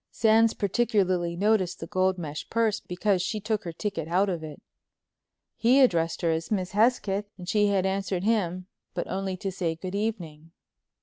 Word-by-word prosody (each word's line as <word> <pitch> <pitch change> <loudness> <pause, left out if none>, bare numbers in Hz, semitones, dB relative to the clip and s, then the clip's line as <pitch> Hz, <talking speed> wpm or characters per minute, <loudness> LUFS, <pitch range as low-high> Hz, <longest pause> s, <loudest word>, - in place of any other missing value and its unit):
Sands 225 0 +3
particularly 190 -5 +1
noticed 195 -1 +1
the - - -5
gold 185 -1 +1
mesh 155 -3 -6
purse 225 -2 +1
because 185 +1 0
she 215 +4 -2
took 210 -1 -2
her 170 - -3
ticket 165 -2 -4
out 185 +4 +2
of 170 -4 -3
it. 150 -2 -8 1.0
He 250 +4 +4
addressed 170 -11 +2
her 165 - +3
as 160 0 -2
Miss 185 -4 -1
Hesketh 210 -2 +2
and 180 -2 -10
she 205 +2 +3
had 195 -2 +1
answered 190 -1 -1
him, 185 -5 0 0.3
but 175 - -2
only 190 0 -3
to 195 +1 -3
say 170 -3 -2
"Good 185 +3 -7
evening." 170 -7 -4
190 Hz, 175 wpm, -27 LUFS, 175-210 Hz, 1.0 s, He